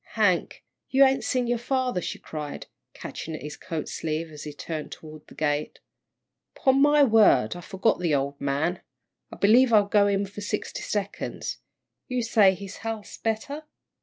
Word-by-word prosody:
"Hank, - - +1 0.3
you 270 +1 +6
ain't 265 0 +2
seen 250 -1 0
your 240 0 0
father," 250 -5 -1
she - - -4
cried, 150 -2 -7 0.3
catching 160 - -6
at - - -8
his 150 0 -6
coat 160 -2 -5
sleeve, 160 +1 -3
as 150 -1 -9
he 150 - -5
turned 155 +1 -6
toward 155 -1 -11
the - - -15
gate. 150 -1 -1 0.8
"'Pon 270 0 +3
my 295 0 +6
word, 215 - +5
I 175 - -7
forgot 195 +4 0
the 170 -4 +1
old 140 +1 -2
man. 145 +6 -1 0.5
I - - -8
believe 235 +5 +5
I'll 210 -2 +6
go 205 0 +3
in 200 0 +1
for 200 +1 -9
sixty 210 +1 -3
seconds. 205 -1 -4 0.5
You 250 -1 -1
say 210 -4 +5
his 200 0 -9
health's 225 -2 -6
better?" 280 +8 -3
200 Hz, 170 wpm, -26 LUFS, 155-235 Hz, 0.8 s, you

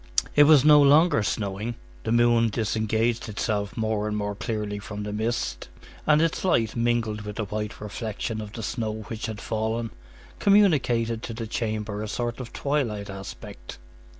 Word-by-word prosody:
It 145 - +8
was 150 -2 +6
no 150 -1 +8
longer 145 -1 +5
snowing; 105 +2 -2 0.3
the - - -1
moon 120 -1 +4
disengaged 110 +2 0
itself 105 0 -2
more 110 -1 0
and 105 0 -2
more 105 0 -2
clearly 105 -1 -3
from 105 0 -6
the 105 0 -4
mist, 115 +3 -2 0.4
and 155 +1 +5
its 165 - 0
light, 115 - +2
mingled 115 -2 0
with 105 0 -7
the 110 - -2
white 105 +1 -4
reflection 110 +1 -4
of 105 -1 -8
the 115 - -6
snow 110 0 -3
which 115 -1 -4
had 110 -2 -5
fallen, 110 +1 -2 0.5
communicated 130 - +3
to 115 - -6
the 115 0 -4
chamber 110 -2 -3
a 110 - -3
sort 120 +3 -3
of 125 -2 -7
twilight 115 -9 -1
aspect. 95 -10 -9
110 Hz, 165 wpm, -26 LUFS, 105-120 Hz, 0.5 s, It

